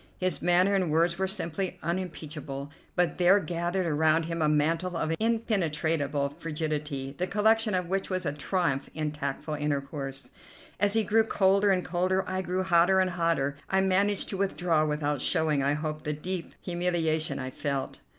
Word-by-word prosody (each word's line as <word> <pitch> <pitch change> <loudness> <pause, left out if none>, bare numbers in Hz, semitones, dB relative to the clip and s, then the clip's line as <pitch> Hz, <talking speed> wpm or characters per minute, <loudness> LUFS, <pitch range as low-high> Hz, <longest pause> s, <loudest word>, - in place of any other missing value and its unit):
His 185 -6 0
manner 180 +3 +4
and 185 -4 +1
words 170 +3 +2
were 190 - +1
simply 185 -1 -3
unimpeachable, 155 -5 -4 0.2
but 175 -2 +1
there 180 +3 +6
gathered 175 +1 -2
around 160 0 +3
him 165 0 -3
a 155 - +3
mantle 165 +4 +1
of 160 0 0
impenetrable 160 - 0
frigidity 150 -4 -3
the 180 - 0
collection 220 +1 +2
of 180 -1 -1
which 195 +2 -1
was 185 -1 -2
a 145 - -1
triumph 150 -2 -1
in 155 -1 -1
tactful 150 +1 -4
intercourse. 140 -3 -3 0.5
As 205 0 +2
he 225 0 +3
grew 220 +2 +3
colder 200 -1 +3
and 185 -2 +2
colder, 185 +2 0
I 185 0 -1
grew 185 0 -1
hotter 185 +1 +4
and 185 -1 +2
hotter. 165 -5 0
I 190 0 +3
managed 195 +1 +2
to 195 - -3
withdraw 175 -5 +1
without 150 -2 -1
showing, 160 -4 +1
I 140 +1 +2
hope, 155 0 -3
the 150 - -2
deep 175 +3 -4
humiliation 165 -4 0
I 130 -1 -4
felt. 140 0 -3
170 Hz, 170 wpm, -28 LUFS, 150-185 Hz, 0.5 s, there